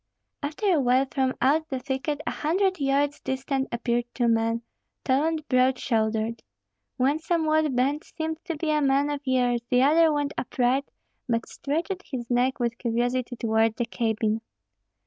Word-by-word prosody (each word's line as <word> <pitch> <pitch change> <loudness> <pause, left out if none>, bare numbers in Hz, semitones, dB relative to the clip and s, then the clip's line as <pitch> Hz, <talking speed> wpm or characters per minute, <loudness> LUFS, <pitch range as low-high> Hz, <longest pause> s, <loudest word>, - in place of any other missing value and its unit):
After 300 +8 -4
a 320 - +3
while 255 +1 +3
from 265 -2 0
out 315 +4 +2
the 265 - -2
thicket 270 +3 -3
a - - -1
hundred 375 +3 0
yards 280 +1 +1
distant 265 +1 -2
appeared 235 0 0
two 240 -2 +1
men, 230 0 +1 0.4
tall 270 +3 +2
and 320 -2 -2
broad 255 0 +3
shouldered. 220 -1 -1 0.6
One 275 +4 +2
somewhat 315 -3 +1
bent 275 +5 +1
seemed 320 0 -5
to 335 -3 -3
be 310 0 -1
a 300 0 +2
man 280 +1 +2
of 290 -1 -3
years; 245 -2 +2
the 250 +1 +4
other 320 +3 +5
went 290 -1 -1
upright, 255 +2 0 0.4
but 230 -1 0
stretched 335 +7 -3
his 245 -4 -4
neck 250 +2 +2
with 235 -1 -1
curiosity 245 +1 -1
toward 225 -1 +1
the 240 - -1
cabin. 225 -1 -1
265 Hz, 165 wpm, -26 LUFS, 240-300 Hz, 0.6 s, other